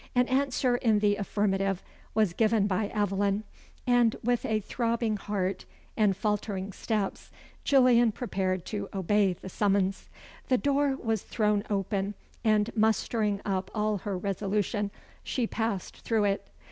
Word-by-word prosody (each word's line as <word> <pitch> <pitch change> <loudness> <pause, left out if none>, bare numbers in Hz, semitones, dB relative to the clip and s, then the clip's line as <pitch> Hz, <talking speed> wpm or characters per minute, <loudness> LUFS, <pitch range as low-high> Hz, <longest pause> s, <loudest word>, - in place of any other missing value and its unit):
An 250 0 +4
answer 260 -2 +2
in 225 -4 +3
the 205 0 +3
affirmative 195 -2 0 0.3
was 215 -6 +3
given 220 0 +3
by 205 +1 0
Aveline, 200 0 0 0.4
and, 245 -2 +4
with 245 0 +1
a 220 -1 +1
throbbing 230 +1 -1
heart 195 -2 -2 0.3
and 205 -4 +2
faltering 205 -2 -2
steps, 210 -2 -2 0.3
Gillian 250 -4 +5
prepared 190 -6 -2
to 205 -2 -4
obey 195 +1 +2
the 180 - -11
summons. 195 0 0 0.4
The 255 - +3
door 280 0 +1
was 225 -3 -1
thrown 210 -2 0
open, 200 0 -1 0.3
and 215 0 +2
mustering 215 -1 +1
up 190 -2 -1
all 210 -1 0
her 195 0 -3
resolution, 200 +2 -1 0.3
she 250 - -1
passed 220 -4 -3
through 225 -2 0
it. 200 -1 0
210 Hz, 135 wpm, -28 LUFS, 195-225 Hz, 0.4 s, Gillian